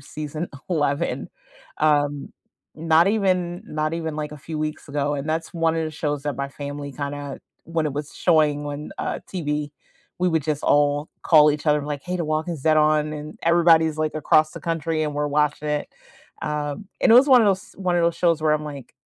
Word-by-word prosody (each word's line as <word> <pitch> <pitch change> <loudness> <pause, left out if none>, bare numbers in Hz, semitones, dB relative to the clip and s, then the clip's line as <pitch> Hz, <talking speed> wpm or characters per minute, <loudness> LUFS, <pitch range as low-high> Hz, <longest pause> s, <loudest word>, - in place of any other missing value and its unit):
season 155 +3 -6 0.2
11, 145 -4 -1 0.5
um, 145 -2 +1 0.4
not 165 +2 +3
even 185 -4 0
not 155 0 -2
even 160 -2 -4
like 150 -1 -4
a 150 - -9
few 155 +2 -6
weeks 155 0 -4
ago, 145 0 -1
and 140 +2 -4
that's 160 +1 -2
one 165 -1 +1
of 160 - 0
the 155 - -4
shows 150 -2 -3
that 145 -1 -1
my 140 0 -3
family 145 0 -7
kinda 145 0 -5 0.2
when 165 -1 -1
it 150 - -3
was 145 0 -5
showing 150 -4 +2
on, 145 +1 -6
uh, - - -2
TV 150 -5 -2 0.5
we 180 - +3
would 160 -3 +1
just 150 0 -2
all 145 +1 +2
call 150 -2 +6
each 150 - -5
other 150 0 +4
and 145 - -6
like, 145 -2 -4
"Hey, 180 0 -2
The 170 - -1
Walking 155 +3 -1
Dead 155 +1 +4
on," 155 0 +3
and 150 +1 -8
everybody's 165 -2 +4
like 155 -1 -1
across 155 0 +3
the - - -8
country 165 -1 -1
and 150 -1 -2
we're 150 0 0
watching 150 +1 0
it. 150 0 -1 0.5
Um, 150 +5 -3
and - - +4
it - - +8
was 255 +3 +8
one 255 -2 +8
of - - +3
those 195 0 0
one 185 -2 0
of 175 - +2
those 170 0 +1
shows 165 -3 +2
where 155 -1 +3
I'm 150 0 0
like, 140 -4 -9
155 Hz, 210 wpm, -23 LUFS, 145-165 Hz, 0.5 s, it